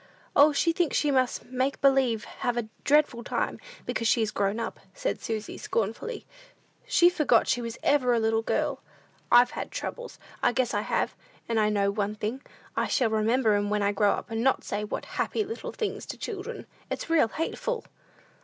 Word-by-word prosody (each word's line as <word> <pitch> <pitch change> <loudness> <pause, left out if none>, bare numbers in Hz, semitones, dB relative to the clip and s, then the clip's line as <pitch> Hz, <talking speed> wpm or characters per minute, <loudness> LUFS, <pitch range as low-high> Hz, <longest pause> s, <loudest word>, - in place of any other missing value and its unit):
"O, 290 +2 +7
she 330 +3 +2
thinks 340 -3 +1
she 295 - +2
must 260 -2 +1
make 260 +2 -1
believe 265 -5 +3
have 245 -1 -3
a 235 -2 -1 0.2
dreadful 290 -5 +3
time, - - -2 0.3
because 230 - -1
she 230 0 +3
is 210 - -1
grown 200 +2 0
up," - - -4 0.2
said - - -2
Susy, 220 -3 -4
scornfully. 230 - -3 0.6
"She's 355 -7 +5
forgot 250 -8 +3
she 245 - +1
was 230 -1 -5
ever 275 -4 +3
a 235 - +3
little 225 0 +2
girl! 285 +3 -1 0.5
I've 245 +1 +7
had - - -5
troubles; - - -6 0.2
I - - +3
guess 245 0 0
I - - +1
have! - - -1 0.3
And 230 -1 +1
I 210 0 +3
know 200 -1 +2
one 205 0 -2
thing, 220 +5 -3 0.3
I - - +1
shall 245 -5 +1
remember 220 +1 +2
'em 205 0 +1
when 210 0 +1
I 200 - +3
grow 205 0 +3
up, - - -6
and 225 0 -1
not 265 - +2
say, 205 +1 -3
'What 210 - -4
happy 435 - -1
little 445 +3 -6
things!' 435 - -4
to - - -6
children. 440 +2 -6 0.2
It's - - -4
real 330 -7 +4
hateful!" 330 - -3
245 Hz, 190 wpm, -27 LUFS, 220-295 Hz, 0.6 s, O